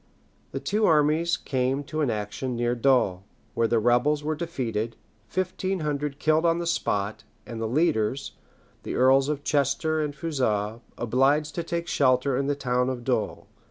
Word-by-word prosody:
The - - -3
two 215 +1 +1
armies 160 +3 +3
came 130 +1 -1
to 155 +2 -3
an 145 - +1
action 110 +4 -3
near 120 0 0
Dol, 120 -7 +2 0.3
where 115 - +2
the 115 - +2
rebels 120 +6 +2
were 155 +1 0
defeated, 120 -9 -3 0.3
fifteen 185 0 -2
hundred 145 -1 -2
killed 155 +1 +2
on 165 0 +3
the 170 - -3
spot, 105 -11 -1 0.2
and 115 -1 -6
the 110 - -1
leaders, 130 -2 0 0.5
the - - -5
earls 135 +2 +4
of 145 -1 -2
Chester 145 +3 +1
and 145 -1 -4
Fougeres, 115 -9 -1 0.2
obliged 135 +6 +2
to 170 - -2
take 170 +1 -3
shelter 130 0 +2
in 140 +2 0
the 145 - +1
town 125 -2 0
of 125 -2 -4
Dol. 120 -4 -2
135 Hz, 165 wpm, -26 LUFS, 120-155 Hz, 0.5 s, earls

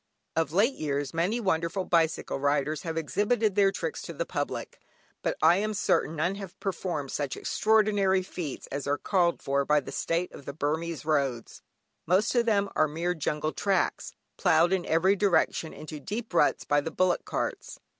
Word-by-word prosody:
Of 160 -3 0
late 210 - +3
years 145 - -3
many 180 +8 0
wonderful 180 -2 0
bicycle 165 -4 +1
riders 145 +1 0
have 165 -1 -4
exhibited 205 - +1
their 195 0 +4
tricks 460 - -4
to - - -7
the - - -3
public, - - -4 0.4
but - - -1
I 165 +3 +6
am 215 +1 -1
certain 165 -4 +1
none 170 +5 0
have 190 -3 -9
performed 175 -7 -3
such 145 -3 -3
extraordinary 205 -3 +2
feats 165 -6 -6
as 140 0 -4
are 145 +1 +1
called 175 -3 +1
for 140 +1 +1
by 150 +2 +3
the 140 - -8
state 170 +2 -1
of 140 - -12
the 140 - -5
Burmese 155 +1 -2
roads, 140 -6 -1 0.5
most 190 +6 +3
of 240 -2 +2
them 200 -2 +2 0.2
mere 165 +4 -1
jungle 155 -1 -2
tracks, 195 -2 -1 0.2
ploughed 175 0 +4
in 185 -2 -1
every 185 +5 +3
direction 190 -4 +1
into 155 0 -8
deep 215 - -5
ruts - - +3
by 145 0 +2
the 165 - -4
bullock 185 +2 +1
carts. - - -4
170 Hz, 175 wpm, -28 LUFS, 150-195 Hz, 0.5 s, I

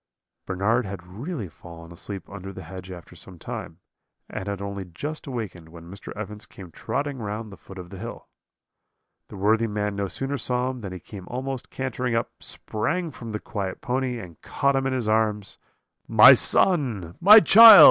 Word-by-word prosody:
"Bernard 105 +6 +1
had 95 -2 -7
really 115 - -6
fallen 85 0 -13
asleep 95 +3 -8
under 95 -1 -8
the 95 -1 -9
hedge 95 +2 -9
after 85 -4 -11
some 95 -2 -11
time, 80 0 -7 0.5
and 95 - -5
had 100 -1 -3
only 100 -1 -5
just 145 - -7
awakened 100 -10 -6
when 85 +1 -12
Mr. 100 - -9
Evans 105 0 -7
came 90 -3 -12
trotting 140 - -3
round 105 0 -5
the - - -9
foot 95 - -13
of 90 0 -9
the 95 - -9
hill. 115 +3 -8 1.0
"The - - -10
worthy 110 +4 +2
man 105 -1 -2
no 100 0 -2
sooner 135 +9 -3
saw 125 +1 -1
him 125 -2 -9
than 100 -3 -6
he 90 - -7
came 95 -1 -11
almost 130 +1 -5
cantering 125 -2 -3
up, 115 - -1
sprang 165 +11 -3
from 115 -4 -8
the 105 - -3
quiet 100 -4 -5
pony, 130 -1 -2
and 90 -8 -11
caught 140 0 0
him 135 0 +1
in 135 - -1
his 125 -4 -1
arms. 110 -2 0 0.5
"'My - - +9
son! 115 - +1
my 210 +5 +10
child!' 225 +5 +10
105 Hz, 185 wpm, -25 LUFS, 95-130 Hz, 1.0 s, my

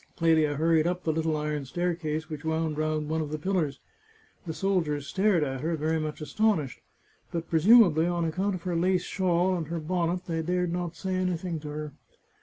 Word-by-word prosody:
Clelia 160 -3 +3
hurried 160 +1 +3
up 180 0 -2
the 160 - +1
little 160 0 0
iron 150 -1 -2
staircase 160 +1 -2
which 155 -2 -7
wound 160 -1 -1
round 155 0 -1
one 160 +1 -1
of 150 - -4
the 155 - -3
pillars; 155 -4 -1 0.7
the - - -2
soldiers 160 -6 0
stared 190 0 +2
at 135 -2 -3
her, 165 +2 0
very 160 +2 0
much 155 0 -4
astonished, 160 - 0 0.5
but 165 -1 -4
presumably 170 -2 +6
on 175 -1 0
account 185 +5 -1
of 175 - -8
her 180 -2 -2
lace 180 +1 +2
shawl, 185 -1 +1
and 165 -4 -3
her 170 +1 -3
bonnet, 175 +2 -1
they 165 -2 -2
dared 180 +1 0
not 175 -1 -3
say 190 +1 -3
anything 180 -2 -1
to 150 - -9
her. 150 -1 -5
165 Hz, 195 wpm, -28 LUFS, 155-180 Hz, 0.7 s, presumably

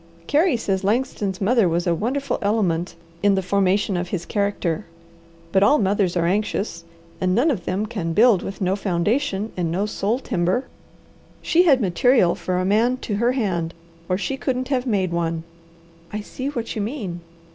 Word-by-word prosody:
Carey 295 - +3
says 195 -4 -1
Langston's 205 -3 -1
mother 210 -1 +3
was 170 +1 0
a 175 - +2
wonderful 260 - -1
element 190 -5 0 0.3
in 205 -1 +4
the 190 - 0
formation 195 +1 +1
of 175 0 -2
his 175 -2 -4
character; 200 -5 -1 0.6
but 190 - +3
all 285 +9 +5
mothers 195 -4 +1
are 170 - +1
anxious, 195 -2 -1 0.4
and 185 0 +2
none 280 +8 +3
of 190 -10 -3
them 195 +4 -1
can 185 -6 -3
build 215 +2 +5
with 195 - -7
no 185 0 +1
foundation 205 +4 -1
and 175 -2 -1
no 190 +4 0
soul 210 +2 -1
timber. 185 0 -1 0.8
She 350 +2 +4
had 275 -6 +5
material 195 0 +3
for 180 -1 -2
a 185 - 0
man 225 +6 +2
to 205 -4 -2
her 240 +3 +2
hand, 175 -9 -1 0.3
or 185 - +2
she 270 +7 -3
couldn't 255 -1 -2
have 260 -2 0
made 190 -6 +1
one." 165 -1 -1 0.7
"I 210 - -3
see 255 +5 -6
what 235 -5 -4
you 215 - -2
mean." 205 -7 -4
200 Hz, 180 wpm, -22 LUFS, 180-240 Hz, 0.8 s, all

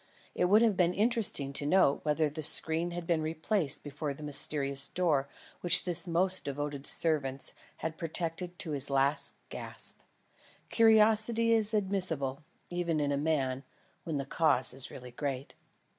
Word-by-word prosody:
It - - 0
would 210 +5 +4
have 220 -4 +2
been 180 -1 +1
interesting 210 - 0
to 145 - -2
note 180 -4 +3
whether 155 +1 0
the 150 +2 -6
screen 160 +3 +2
had 175 0 -6
been 165 -2 0
replaced 160 +1 -1
before 145 0 -5
the 150 - -11
mysterious 140 -1 +3
door 155 -7 0 0.3
which 175 - +4
this 175 -1 -1
most 185 +2 0
devoted 145 0 -4
of - - -12
servants 140 -5 +2 0.3
had 160 -1 -4
protected 170 +2 -3
to 160 - -3
his 140 -1 +1
last 140 +1 0
gasp. - - -6 0.7
Curiosity 225 +1 +3
is 220 -2 +1
admissible, 180 -9 -1 0.3
even 170 -3 -1
in 145 -1 -1
a - - 0
man, 140 -3 -1 0.4
when 160 -3 -3
the 140 - -3
cause 140 -4 +2
is 130 0 -2
really 125 -1 -11
great. 135 +1 -5
160 Hz, 160 wpm, -30 LUFS, 140-180 Hz, 0.7 s, would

